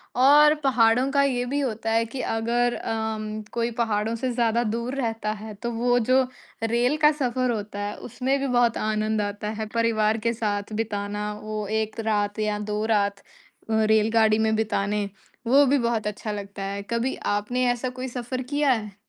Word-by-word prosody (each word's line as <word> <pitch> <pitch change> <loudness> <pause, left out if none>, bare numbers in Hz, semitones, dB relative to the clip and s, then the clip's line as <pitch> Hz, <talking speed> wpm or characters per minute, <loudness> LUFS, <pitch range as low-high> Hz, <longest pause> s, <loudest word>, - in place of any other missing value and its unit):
और 295 +4 +7
पहाड़ों 250 0 +3
का 280 0 +3
ये 245 -3 0
भी 280 +3 -1
होता 225 -4 -2
है 230 0 +2
कि 255 +3 -5
अगर 235 +2 0
अम, 215 -1 -3
कोई 235 0 0
पहाड़ों 225 -1 0
से 250 +2 -2
ज़्यादा 235 0 +2
दूर 235 +4 -2
रहता 225 -4 -2
है 220 -1 -7
तो 235 +4 -5
वो 245 +2 +2
जो 255 +3 +3 0.4
रेल 240 +6 +2
का 300 -1 +5
सफर 255 -4 0
होता 210 -2 -4
है, 205 0 -3
उसमें 260 +4 -1
भी 275 - -1
बहुत 240 -2 +2
आनंद 215 0 0
आता 205 +1 -3
है, 220 0 -4
परिवार 225 -1 +2
के 230 +1 0
साथ 210 -2 -2
बिताना 210 -1 -3
वो 215 -1 -4
1 220 +1 -2
रात 210 -1 0
या 210 -1 0
2 210 0 -2
रात 200 -1 0 0.5
अ, 220 0 +2
रेलगाड़ी 220 0 +4
में 220 0 +2
बिताने 205 -1 -1 0.4
वो 280 +3 +6
भी 280 +2 +3
बहुत 235 -3 0
अच्छा 210 +1 -4
लगता 200 -1 -6
है। 200 +1 -3
कभी 235 +2 0 0.2
आपने 245 +5 -1
ऐसा 245 +1 -2
कोई 260 - -3
सफर 250 +1 -4
किया 285 +1 +1
है? 210 -4 -2
225 Hz, 180 wpm, -25 LUFS, 215-245 Hz, 0.5 s, और